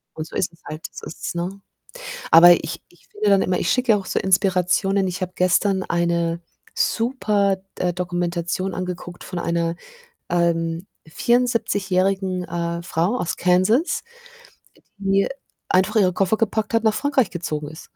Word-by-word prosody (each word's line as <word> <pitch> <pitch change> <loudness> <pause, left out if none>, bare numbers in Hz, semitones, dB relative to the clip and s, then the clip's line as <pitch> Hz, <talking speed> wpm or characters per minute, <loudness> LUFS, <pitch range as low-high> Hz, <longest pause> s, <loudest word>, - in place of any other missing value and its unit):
Und 155 0 -5
so - - -12
ist 175 - 0
es 165 - -24
halt, 155 +1 -7
so - - -9
ist - - -8
es, - - -3
ne? 185 +3 -4 0.7
Aber 170 +2 +10
ich - - -5
ich 175 - -25
finde 210 0 0
dann 195 -1 +5
immer, 185 - 0
ich 170 - -1
schicke 250 -2 +2
ja - - +3
auch 195 - -6
so - - -1
Inspirationen. 190 +1 +2
Ich 180 +1 -4
habe 185 0 -3
gestern 190 +1 +2
eine 170 -1 0 0.3
super 210 -5 +1 0.2
D - - -3
äh, 180 -1 +1
Dokumentation 175 +1 -2
angeguckt 180 -1 -6
von 180 - -5
einer, 170 0 -1 0.5
ähm, 170 0 0 0.2
vierundsiebzigjährigen, 195 -4 +1
äh, 170 0 -3
Frau 180 +6 0
aus 175 - -2
Kansas, 185 - +2 0.9
die 195 0 +2 0.4
einfach 190 +4 +2
ihre 185 -4 +4
Koffer 195 +3 +1
gepackt 220 0 -1
hat, 230 0 +2
nach 220 -1 +3
Frankreich 275 -1 +1
gezogen 155 -4 -4
ist. 155 +2 -12
185 Hz, 160 wpm, -22 LUFS, 170-200 Hz, 0.9 s, Aber